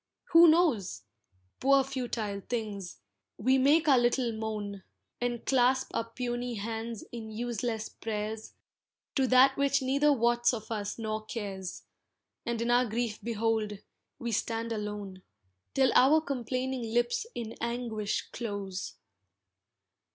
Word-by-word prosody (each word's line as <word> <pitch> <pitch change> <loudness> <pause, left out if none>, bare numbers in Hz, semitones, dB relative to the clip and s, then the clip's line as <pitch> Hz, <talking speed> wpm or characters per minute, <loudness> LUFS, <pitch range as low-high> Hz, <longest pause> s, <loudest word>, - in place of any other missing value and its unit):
Who 335 0 +9
knows? 310 - +3 0.6
Poor 275 +1 +5
futile 240 -6 -3
things, 210 -6 -4 0.4
we 260 +5 +3
make 300 +5 +4
our 270 -4 +6
little 240 0 +2
moan, 215 -3 -4 0.4
And 240 -1 -2
clasp 260 0 +3
our 230 - -1
puny 240 0 -3
hands 225 +1 -4
in 225 -2 -7
useless 225 0 -3
prayers 215 0 -5 0.6
To 265 -2 +2
that 255 +2 +6
which 280 0 +2
neither 280 +3 +3
wots 240 -1 +3
of 220 0 -9
us 205 -2 -3
nor 215 -1 -3
cares, 195 -5 -5 0.6
And 235 -1 -1
in 235 - +1
our 245 +1 +4
grief 225 -1 -2
behold, 225 -2 -1 0.4
we 235 -1 -4
stand 230 +1 -1
alone, 205 -3 -5 0.5
Till 265 -1 +4
our 285 +5 +6
complaining 260 -2 -2
lips 240 - 0
in 225 -1 -5
anguish 235 -3 -2
close. 200 -5 -5
235 Hz, 125 wpm, -30 LUFS, 215-255 Hz, 0.6 s, Who